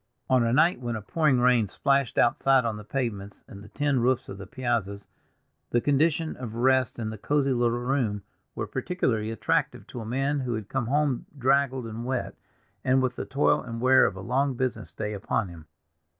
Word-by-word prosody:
On 130 -1 +5
a 115 - +1
night 155 +5 +3
when 120 -1 -3
a 110 - -4
pouring 150 +1 +2
rain 120 -3 +4
splashed 140 +4 0
outside 130 +1 +3
on 115 -2 -1
the 105 - -8
pavements 105 -5 -4
and 100 0 -11
the 105 - -13
tin 145 0 0
roofs 125 +1 +1
of 100 - -8
the 95 - -8
piazzas, 105 -5 -2 0.6
the 120 - +2
conditions 155 +4 +1
of 120 -3 -7
rest 130 0 +2
in 110 -2 -3
the 110 - -8
cozy 140 +2 +1
little 120 -1 +1
room 120 -5 -1 0.3
were - - -2
peculiarly 115 -12 -1
attractive 115 - -1
to - - -8
a - - -5
man 135 +4 0
who 125 -3 -2
had 110 -2 -6
come 130 -4 -2
home 140 -1 0
draggled 135 -1 +2
and 115 +1 -6
wet, 130 0 -2 0.5
and 130 0 +3
with 130 - -1
the - - -4
toil 140 +2 +2
and 115 -2 -6
wear 130 +2 +5
of - - -4
a 95 - -7
long 130 +5 0
business 120 -4 -3
day 105 0 -4
upon 100 0 -2
him. 80 -2 -12
125 Hz, 200 wpm, -26 LUFS, 110-135 Hz, 0.6 s, On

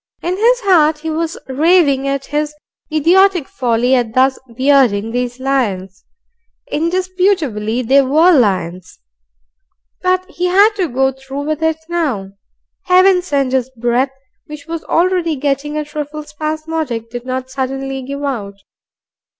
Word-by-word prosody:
In 355 +1 -1
his 480 +5 +2
heart 320 -7 +4
he 320 +1 -5
was 325 +1 -2
raving 280 -1 +3
at 275 0 -2
his 300 +1 -2 0.4
idiotic 350 +1 +3
folly 245 0 0
at 240 -3 0
thus 260 +1 +3 0.2
bearding 255 -6 +3
these 245 +1 -3
lions, 200 -9 -2 0.7
indisputably 335 - 0
they 270 +4 +4
WERE 310 +7 +4
lions, 185 - 0 1.0
but 370 0 +1
he 360 -1 -2
had 400 +4 +5
to 370 -3 0
go 265 +2 +1
through 265 +2 -7
with 310 +1 -3
it 320 0 +1
now. 280 - -2 0.5
Heaven 370 0 +5
send, 280 -7 -1
his 260 -1 0
breath, 240 +3 +1 0.4
which 300 -1 -9
was 330 0 -5
already 350 -2 +1
getting 285 +2 -2
a 300 - -2
trifle 300 0 -6
spasmodic, 305 -5 -4
did 240 0 -6
not 260 0 -4
suddenly 270 0 -3
give 280 +2 -6
out. 215 -8 -3
280 Hz, 135 wpm, -16 LUFS, 255-330 Hz, 1.0 s, had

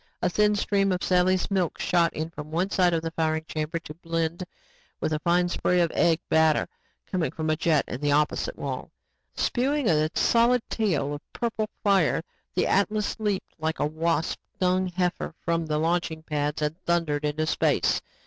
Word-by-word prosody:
A 180 - +2
thin 210 +2 +3
stream 200 -1 +1
of 180 -1 -1
Sally's 185 +1 +2
milk 185 -4 0
shot 170 -2 +2
in 160 +1 -4
from 150 -2 -8
one 175 +5 -1
side 180 -2 +3
of 165 -1 0
the 165 - -3
firing 160 -1 -1
chamber 155 +1 -3
to 165 -2 -8
blend 165 +1 -2 0.6
with 155 - -1
a 155 - 0
fine 175 +2 +2
spray 180 0 +1
of 170 -2 +2
egg, 170 -1 +3
batter 160 -1 +3 0.4
coming 180 -4 -1
from 155 -1 -2
a - - +2
jet 155 -2 +2
in 125 - -5
the 145 -1 +1
opposite 150 - +1
wall. - - -4 0.5
Spewing 270 +1 0
a 155 -2 +3
solid 235 +1 +3
tail 160 -10 0
of 145 - -10
purple 220 -2 -2
fire, 195 -6 +3 0.3
the - - +2
Atlas 210 +1 +1
leaped 205 -3 -2
like 160 +1 -1
a - - +1
wasp 160 +1 -1 0.2
stung 185 -1 +1
heifer 180 -2 -2
from 165 -1 0
the 150 -1 0
launching 160 0 -1
pads 150 -1 -2
and 155 +4 -2
thundered 165 -4 +1
into 150 +1 0
space. - - +1
170 Hz, 180 wpm, -26 LUFS, 155-185 Hz, 0.6 s, thin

